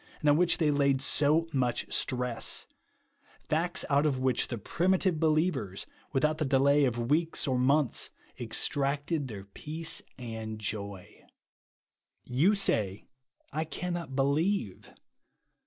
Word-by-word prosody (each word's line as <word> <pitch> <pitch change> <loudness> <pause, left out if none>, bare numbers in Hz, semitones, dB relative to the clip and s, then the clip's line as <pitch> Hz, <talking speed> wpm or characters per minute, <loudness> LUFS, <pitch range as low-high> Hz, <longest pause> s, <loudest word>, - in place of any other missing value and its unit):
and 150 - -2
on - - +4
which 175 +2 +3
they 155 -3 +2
laid 140 -2 +2
so 150 +4 +3
much 125 -3 0
stress; 125 -2 0 0.7
facts 175 +4 0
out 140 0 +3
of 145 -4 +1
which 130 -1 +1
the 120 - -4
primitive 180 - +1
believers,, 155 - 0 0.3
without 155 +3 +1
the - - +1
delay 140 +1 +3
of 120 0 -2
weeks 160 0 +1
or 130 - +1
months, 135 +1 +2 0.3
ex - - -1
tracted 145 +1 -1
their 105 -5 -7
peace 160 +10 -3 0.2
and 110 -3 -6
joy. 100 -3 -6 1.0
You 155 +12 +2
say, 105 - 0 0.5
I 155 +2 0
cannot 170 -3 -5
believe. 140 - 0
140 Hz, 125 wpm, -29 LUFS, 125-160 Hz, 1.0 s, on